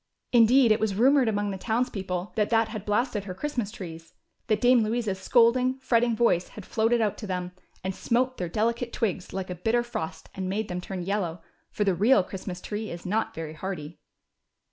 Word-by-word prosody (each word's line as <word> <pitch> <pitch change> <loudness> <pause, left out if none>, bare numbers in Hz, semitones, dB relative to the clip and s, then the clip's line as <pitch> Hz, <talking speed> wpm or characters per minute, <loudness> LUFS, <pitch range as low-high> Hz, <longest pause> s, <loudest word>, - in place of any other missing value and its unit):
Indeed, 240 +1 +6
it 215 - +4
was 215 -3 0
rumored 260 +3 +4
among 205 -1 0
the 190 - -5
townspeople 195 -5 -2
that 210 -2 +1
that 225 -1 +3
had 215 -2 -6
blasted 210 -1 0
her 185 -2 -6
Christmas 245 -3 -2
trees, 165 -6 -9 0.3
that 215 -1 +2
Dame 245 0 +5
Louisa's 215 -3 -1
scolding, 250 +4 +3
fretting 240 -3 +2
voice 215 -6 +2
had 210 - -11
floated 230 +1 +2
out 210 -2 0
to 215 - -6
them, 180 -1 -3 0.3
and 190 0 -2
smote 255 +5 0
their 175 -2 -3
delicate 235 +5 -1
twigs 195 -4 -2
like 190 -1 -4
a - - -1
bitter 225 +7 +1
frost 160 -9 -5
and 190 -2 -4
made 210 +2 -2
them 180 0 -3
turn 185 -1 -5
yellow; 175 -4 -2 0.3
for 210 - -1
the 195 -2 +2
real 205 +3 +4
Christmas 185 -1 -7
tree 215 +1 -4
is 170 0 -8
not 215 +4 -1
very 160 -1 -5
hardy. 165 -2 -6
210 Hz, 195 wpm, -27 LUFS, 185-235 Hz, 0.3 s, Indeed